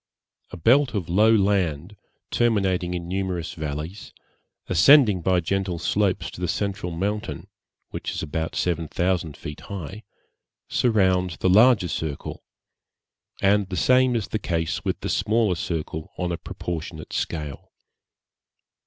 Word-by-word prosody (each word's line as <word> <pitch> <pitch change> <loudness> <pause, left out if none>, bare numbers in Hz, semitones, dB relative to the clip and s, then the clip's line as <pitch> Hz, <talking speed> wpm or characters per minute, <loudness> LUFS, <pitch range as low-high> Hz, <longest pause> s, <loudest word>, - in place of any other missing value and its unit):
A - - -8
belt 125 - +3
of 90 -6 -2
low 105 +6 +5
land, 95 -4 +1 0.4
terminating 95 -6 +1
in 85 -1 -5
numerous 90 -2 -3
valleys, 80 +5 -6 0.5
ascending 105 - +6
by 90 +1 +2
gentle 95 +1 -1
slopes 95 +2 0
to - - -10
the 90 - 0
central 95 -1 -2
mountain, 100 +5 -3 0.5
which - - -5
is - - -4
about 80 +2 -3
seven 85 -2 -1
thousand 85 -3 -1
feet 75 - -8
high, 100 +1 -7 0.7
surrounds 95 -7 +2
the 95 - +1
larger 110 0 +6
circle, 80 -4 -5 1.0
and 100 0 +3
the 90 - -3
same 130 +4 +4
is 110 -3 -2
the 110 - -2
case 85 -4 -2
with - - -2
the - - -3
smaller 110 0 +2
circle 80 -2 -4
on 90 -1 -2
a 85 - -2
proportionate 80 -2 -6
scale. 75 -4 -4
90 Hz, 135 wpm, -24 LUFS, 85-105 Hz, 1.0 s, ascending